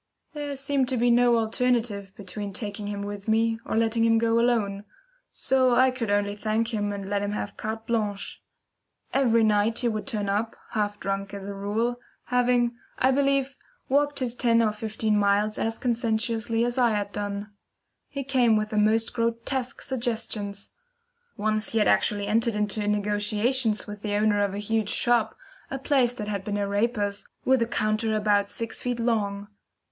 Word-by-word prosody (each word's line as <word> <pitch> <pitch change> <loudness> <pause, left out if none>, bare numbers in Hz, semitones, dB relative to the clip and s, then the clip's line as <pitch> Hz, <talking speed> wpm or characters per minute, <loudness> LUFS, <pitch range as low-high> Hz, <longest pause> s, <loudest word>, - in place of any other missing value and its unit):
There 290 -2 -4
seemed 270 -1 0
to 260 - 0
be 240 +1 +3
no 240 0 +5
alternative 225 -3 0
between 200 +1 -6
taking 205 0 -5
him 205 -1 -4
with 205 0 -6
me, 225 +1 +2
or - - -2
letting 225 0 +2
him 225 0 +4
go 230 0 +2
alone; 215 -5 +1 0.5
so 260 -2 +2
I 260 +1 +5
could 245 -4 -4
only 205 0 +1
thank 220 +2 -1
him 205 -1 -1
and 200 -1 -5
let 200 0 0
him 205 0 -2
have 205 - -4
carte 220 +1 -5
blanche. 215 -4 -2 0.7
Every 235 -4 +3
night 215 +1 +2
he 245 - +1
would 215 0 -2
turn 210 -6 -1
up, 210 +3 -1 0.2
half 205 -2 -1
drunk 195 0 -3
as 195 -1 -7
a 200 - -5
rule, 220 +5 -1 0.2
having, 245 -1 +2 0.2
I 260 - +3
believe, 275 0 +1 0.3
walked 290 +1 +2
his 245 -2 0
ten 235 -2 +3
or 215 - +2
fifteen 215 0 -1
miles 205 +1 +2
as 225 0 -1
conscientiously 230 -1 0
as 245 +2 -1
I 240 -1 +5
had 205 -1 -2
done. 205 0 -4 0.6
He 280 -1 -5
came 250 -4 +3
with 215 0 -1
the 215 - -1
most 220 +2 +2
grotesque 235 +2 -2
suggestions. 220 -5 -3 0.7
Once 215 +1 0
he - - +1
had 210 - +3
actually 205 -1 +2
entered 225 +2 +2
into 210 0 -1
negotiations 210 +3 +1
with 205 -1 -8
the 205 -1 -2
owner 205 -1 +2
of 200 -1 -1
a - - -4
huge 210 0 -1
shop, 235 -2 +1 0.3
a 270 - -3
place 265 -3 +2
that 210 -3 -5
had 200 -2 -3
been 205 +1 -2
a 200 -1 -1
raper's, 205 -1 0 0.2
with 260 -1 +4
a 230 - +2
counter 215 0 0
about 205 -1 +2
sixty 235 +2 -3
feet - - -10
long. 205 -4 -1
220 Hz, 180 wpm, -26 LUFS, 205-240 Hz, 0.7 s, no